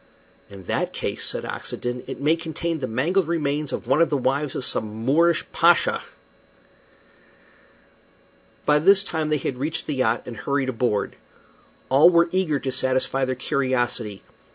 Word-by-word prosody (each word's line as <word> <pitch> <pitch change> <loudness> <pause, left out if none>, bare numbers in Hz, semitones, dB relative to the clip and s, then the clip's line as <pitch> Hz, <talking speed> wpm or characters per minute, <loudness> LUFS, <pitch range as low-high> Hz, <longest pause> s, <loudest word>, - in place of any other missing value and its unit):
"In 100 -1 -11
that - - -2
case," - - -4
said - - -2
Oxenden, 125 0 -5
"it - - -6
may 150 +3 +3
contain 165 0 -4
the 130 - -3
mangled 160 +10 0
remains 150 -3 -1
of - - -4
one 135 +6 +2
of 165 - +4
the 145 - +1
wives 135 +2 -1
of 130 - -3
some 110 +1 -1
Moorish 165 +4 +3
pasha." 170 +1 +3 2.6
By 150 0 +4
this 195 +5 +5
time 160 -5 -2
they 155 - +2
had 130 -2 -4
reached 155 +4 -3
the 150 - -2
yacht 120 -4 0
and 120 - -7
hurried 140 -2 -1
aboard. 115 -4 -1 0.7
All 140 +6 +7
were 170 -1 +3
eager 180 -6 +1
to 135 - -2
satisfy 130 +1 +1
their 130 0 -2
curiosity. 120 -5 -1
140 Hz, 155 wpm, -23 LUFS, 125-160 Hz, 2.6 s, All